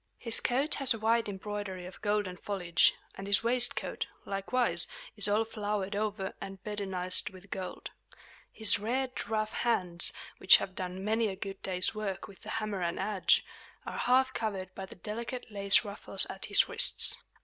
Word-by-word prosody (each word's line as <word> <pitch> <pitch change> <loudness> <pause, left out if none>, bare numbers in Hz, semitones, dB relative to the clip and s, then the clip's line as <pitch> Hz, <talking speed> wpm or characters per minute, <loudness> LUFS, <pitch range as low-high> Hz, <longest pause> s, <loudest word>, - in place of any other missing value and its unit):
His 230 -2 +1
coat 270 +5 0
has 260 -4 +4
a - - -6
wide 225 0 +1
embroidery 200 -2 -6
of 180 - -12
golden 205 -3 -1
foliage; 180 -3 +1 0.2
and 195 - -8
his 200 +1 +5
waistcoat, 245 +1 0 0.2
likewise, 200 +6 0 0.3
is - - +6
all 210 +2 +1
flowered 210 -2 -3
over 205 -2 -3
and 195 0 -7
bedizened 190 -3 0
with 190 +1 -16
gold. 185 -1 -6 0.6
His 220 -2 +2
red, 255 +5 -3
rough 215 -1 -1
hands, 180 -7 +2 0.3
which 190 - +8
have 190 - -6
done 185 +1 -5
many 220 +1 +1
a 195 - -4
good 195 0 -7
day's 185 +1 +1
work 200 -3 -5
with 195 -3 -16
the - - -10
hammer 215 -3 -3
and 170 0 -2
adze, 205 -3 +2 0.4
are - - -6
half 260 +1 +2
covered 195 -5 -4
by 190 -1 -8
the - - -12
delicate 230 +5 -6
lace 200 +1 +6
ruffles 205 0 +1
at - - -5
his - - +5
wrists. 475 +1 +5
205 Hz, 170 wpm, -30 LUFS, 190-225 Hz, 0.6 s, which